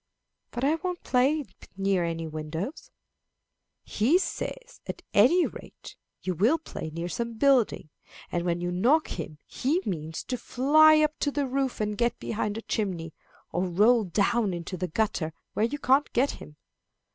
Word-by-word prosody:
"But 240 Hz, -, -5 dB
I 285 Hz, +3 st, +4 dB
won't 360 Hz, -1 st, -3 dB
play 275 Hz, +4 st, +2 dB, 0.3 s
near 195 Hz, -2 st, +1 dB
any 165 Hz, -1 st, -2 dB
windows." 160 Hz, -, -5 dB, 0.9 s
"He 250 Hz, +12 st, +2 dB
says, -, -, -5 dB
at -, -, -6 dB
any 280 Hz, -, +5 dB
rate -, -, -10 dB, 0.3 s
you 185 Hz, -, -1 dB
will 220 Hz, -, +3 dB
play 300 Hz, -, -7 dB
near 165 Hz, +2 st, -4 dB
some 235 Hz, +5 st, -4 dB
building, 250 Hz, -, +2 dB, 0.4 s
and 175 Hz, -, -1 dB
when 175 Hz, -1 st, -1 dB
you 175 Hz, 0 st, -2 dB
knock 250 Hz, -, +3 dB
him 150 Hz, -, -6 dB
he 295 Hz, +8 st, 0 dB
means 160 Hz, -3 st, -4 dB
to 250 Hz, -, -3 dB
fly 310 Hz, +6 st, +5 dB
up 305 Hz, 0 st, 0 dB
to 290 Hz, -, +1 dB
the 285 Hz, 0 st, -1 dB
roof 265 Hz, 0 st, -1 dB
and 210 Hz, -1 st, -1 dB
get 235 Hz, +3 st, 0 dB
behind 210 Hz, -1 st, -3 dB
a 225 Hz, -, -6 dB
chimney, 175 Hz, -7 st, -3 dB, 0.4 s
or 180 Hz, +1 st, 0 dB
roll 215 Hz, +6 st, +4 dB
down 200 Hz, +2 st, +1 dB
into 170 Hz, +2 st, -5 dB
the 180 Hz, 0 st, -3 dB
gutter 175 Hz, -4 st, -1 dB, 0.2 s
where 215 Hz, -, +2 dB
you 285 Hz, +6 st, -3 dB
can't 275 Hz, +1 st, +2 dB
get 265 Hz, +4 st, +2 dB
him." 150 Hz, -, -11 dB
220 Hz, 165 wpm, -27 LUFS, 175-275 Hz, 0.9 s, any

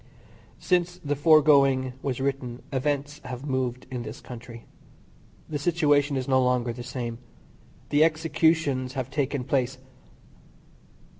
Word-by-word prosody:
Since 175 Hz, -1 st, 0 dB
the 145 Hz, 0 st, 0 dB
foregoing 140 Hz, -4 st, +5 dB
was 130 Hz, -3 st, -2 dB
written 130 Hz, -3 st, -3 dB
events 145 Hz, +2 st, -1 dB
have 130 Hz, +1 st, -7 dB
moved 130 Hz, -3 st, -2 dB
in 125 Hz, -2 st, -3 dB
this 110 Hz, 0 st, -7 dB
country. 120 Hz, -1 st, -10 dB, 0.8 s
The 150 Hz, -2 st, -3 dB
situation 145 Hz, -3 st, +2 dB
is 130 Hz, -, -3 dB
no 130 Hz, -1 st, +4 dB
longer 125 Hz, -1 st, +1 dB
the 120 Hz, -, -8 dB
same. 120 Hz, -2 st, -5 dB, 0.7 s
The 145 Hz, +1 st, +4 dB
executions 160 Hz, -4 st, +1 dB
have 130 Hz, -1 st, -4 dB
taken 140 Hz, -2 st, -1 dB
place. 130 Hz, 0 st, 0 dB
135 Hz, 125 wpm, -26 LUFS, 125-145 Hz, 0.8 s, foregoing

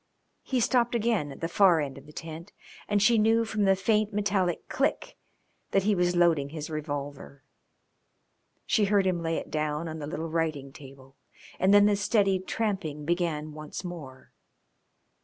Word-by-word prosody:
He 260 Hz, -, -1 dB
stopped 240 Hz, 0 st, +2 dB
again 220 Hz, -10 st, 0 dB
at 135 Hz, -, -11 dB
the 165 Hz, -, -1 dB
far 175 Hz, -1 st, +4 dB
end 140 Hz, -3 st, -3 dB
of 140 Hz, +1 st, -13 dB
the -, -, -12 dB
tent, 165 Hz, +2 st, -8 dB, 0.4 s
and 205 Hz, 0 st, +2 dB
she 230 Hz, 0 st, +5 dB
knew 225 Hz, +2 st, +3 dB
from 215 Hz, -2 st, -1 dB
the 195 Hz, 0 st, +4 dB
faint 210 Hz, +2 st, +1 dB
metallic 200 Hz, -4 st, 0 dB
click -, -, -1 dB, 0.5 s
that 195 Hz, -, +2 dB
he 210 Hz, +1 st, +2 dB
was 180 Hz, -1 st, +1 dB
loading 165 Hz, -5 st, +3 dB
his 155 Hz, +1 st, -6 dB
revolver. 145 Hz, -2 st, -6 dB, 1.2 s
She 210 Hz, -, +2 dB
heard 200 Hz, -1 st, +2 dB
him 180 Hz, -2 st, 0 dB
lay 165 Hz, 0 st, -1 dB
it -, -, -6 dB
down 155 Hz, +1 st, -2 dB
on 160 Hz, 0 st, -6 dB
the 145 Hz, -, -5 dB
little 160 Hz, +1 st, -5 dB
writing 155 Hz, -5 st, -2 dB
table, 135 Hz, -1 st, -14 dB, 0.4 s
and 190 Hz, -, +3 dB
then 205 Hz, 0 st, +7 dB
the 205 Hz, 0 st, +4 dB
steady 195 Hz, -1 st, +2 dB
tramping 185 Hz, -7 st, -3 dB
began 160 Hz, -3 st, -1 dB
once 155 Hz, +3 st, -7 dB
more. 155 Hz, -8 st, -9 dB
170 Hz, 170 wpm, -27 LUFS, 150-205 Hz, 1.2 s, then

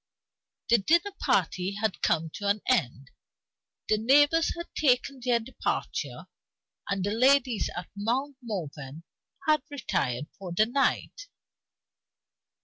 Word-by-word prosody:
The 235 Hz, -1 st, +6 dB
dinner 340 Hz, -, +2 dB
party 185 Hz, +2 st, 0 dB
had 215 Hz, -1 st, -2 dB
come 160 Hz, -1 st, +1 dB
to 205 Hz, -, -5 dB
an 205 Hz, +1 st, +1 dB
end; 135 Hz, -, 0 dB, 0.8 s
the 215 Hz, -, +2 dB
neighbors 290 Hz, +7 st, +4 dB
had 340 Hz, -, -8 dB
taken 265 Hz, -1 st, +1 dB
their 245 Hz, -2 st, +2 dB
departure; 245 Hz, +3 st, -4 dB, 0.6 s
and 195 Hz, -2 st, -1 dB
the 205 Hz, -, -1 dB
ladies 255 Hz, 0 st, +3 dB
at 175 Hz, -, -5 dB
Mount 255 Hz, +7 st, -1 dB
Morven 160 Hz, -, -6 dB, 0.4 s
had 305 Hz, -2 st, +3 dB
retired 150 Hz, -, -2 dB
for 185 Hz, -3 st, -6 dB
the 215 Hz, +5 st, +4 dB
night. 280 Hz, -, -1 dB
225 Hz, 120 wpm, -28 LUFS, 190-275 Hz, 0.8 s, The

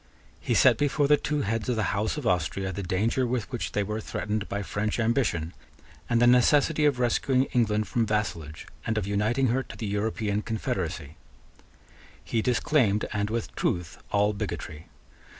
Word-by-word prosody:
He -, -, -1 dB
set -, -, +5 dB
before 145 Hz, 0 st, +2 dB
the 150 Hz, -, +6 dB
two 150 Hz, 0 st, -1 dB
heads 110 Hz, +3 st, -2 dB
of 125 Hz, -, +1 dB
the 110 Hz, -2 st, 0 dB
House 110 Hz, +7 st, -1 dB
of 150 Hz, -, -5 dB
Austria 95 Hz, +1 st, 0 dB
the 100 Hz, -, -4 dB
danger 105 Hz, +7 st, 0 dB
with 120 Hz, -1 st, -2 dB
which 120 Hz, -, -4 dB
they 105 Hz, -, +1 dB
were 105 Hz, +2 st, -3 dB
threatened 105 Hz, 0 st, -3 dB
by 100 Hz, 0 st, -2 dB
French 105 Hz, +4 st, -2 dB
ambition, 110 Hz, -, 0 dB, 0.6 s
and 120 Hz, -, +3 dB
the 120 Hz, -, +5 dB
necessity 145 Hz, +5 st, +4 dB
of 145 Hz, -3 st, +3 dB
rescuing 125 Hz, +2 st, +2 dB
England 110 Hz, -4 st, +1 dB
from 115 Hz, +3 st, 0 dB
vassalage 85 Hz, -8 st, -2 dB, 0.2 s
and 110 Hz, -, 0 dB
of 105 Hz, -, 0 dB
uniting 110 Hz, +6 st, +1 dB
her 130 Hz, +3 st, +1 dB
to -, -, -11 dB
the 110 Hz, -, -4 dB
European 105 Hz, 0 st, -1 dB
confederacy. 105 Hz, -9 st, -3 dB, 1.1 s
He 115 Hz, -, -1 dB
disclaimed, 120 Hz, -3 st, +2 dB
and 105 Hz, 0 st, -1 dB
with 115 Hz, 0 st, -3 dB
truth, 85 Hz, -1 st, -2 dB
all 105 Hz, +1 st, +2 dB
bigotry. 90 Hz, -6 st, -5 dB
110 Hz, 170 wpm, -27 LUFS, 100-125 Hz, 1.1 s, the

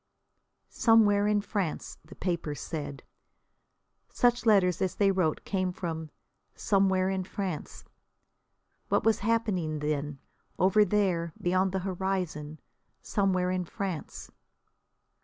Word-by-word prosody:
"Somewhere 210 Hz, -3 st, +4 dB
in 210 Hz, -1 st, +2 dB
France," 200 Hz, -6 st, -3 dB
the 155 Hz, +5 st, -14 dB
papers 170 Hz, -5 st, -3 dB
said. 145 Hz, -4 st, -5 dB, 1.1 s
Such 240 Hz, -1 st, +2 dB
letters 185 Hz, -5 st, +4 dB
as 185 Hz, -2 st, 0 dB
they 200 Hz, -1 st, +3 dB
wrote 180 Hz, -5 st, 0 dB
came 185 Hz, -2 st, -1 dB
from 160 Hz, -3 st, -5 dB, 0.5 s
"somewhere 190 Hz, -2 st, +2 dB
in 190 Hz, -1 st, -1 dB
France." 185 Hz, -4 st, -5 dB, 1.1 s
What -, -, +2 dB
was 225 Hz, -2 st, +3 dB
happening 200 Hz, -8 st, 0 dB
then, 150 Hz, -1 st, -2 dB, 0.4 s
over 195 Hz, +4 st, +5 dB
there, 180 Hz, -5 st, 0 dB
beyond 185 Hz, +1 st, +1 dB
the 190 Hz, 0 st, -2 dB
horizon, 180 Hz, -5 st, -3 dB, 0.4 s
"somewhere 185 Hz, -3 st, +1 dB
in 185 Hz, -1 st, -1 dB
France"? 185 Hz, -2 st, -5 dB
185 Hz, 110 wpm, -29 LUFS, 165-200 Hz, 1.1 s, over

